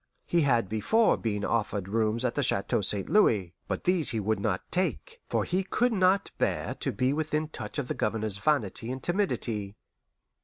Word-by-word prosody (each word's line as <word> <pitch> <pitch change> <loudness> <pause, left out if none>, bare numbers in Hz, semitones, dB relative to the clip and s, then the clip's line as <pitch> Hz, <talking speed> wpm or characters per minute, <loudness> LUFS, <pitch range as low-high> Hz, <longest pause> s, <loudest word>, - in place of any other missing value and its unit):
He 170 - +2
had 120 -8 +2
before 110 - +3
been 105 -3 -2
offered 105 -4 -1
rooms 110 +3 0
at 120 - 0
the 145 - 0
Chateau 100 -6 +1
St. 100 0 0
Louis; 105 - +3
but - - -3
these 180 -3 +2
he 115 - -1
would 110 0 0
not 100 -2 -1
take, 460 - -1
for - - +1
he 185 +2 0
could 240 +5 +1
not 190 0 +2
bear - - 0
to - - -1
be 130 +2 +1
within 155 0 -1
touch - - -6
of 140 -4 -2
the - - -1
Governor's 105 -2 -2
vanity 120 -3 0
and 130 -1 -6
timidity. 115 - -1
120 Hz, 185 wpm, -28 LUFS, 105-175 Hz, -, before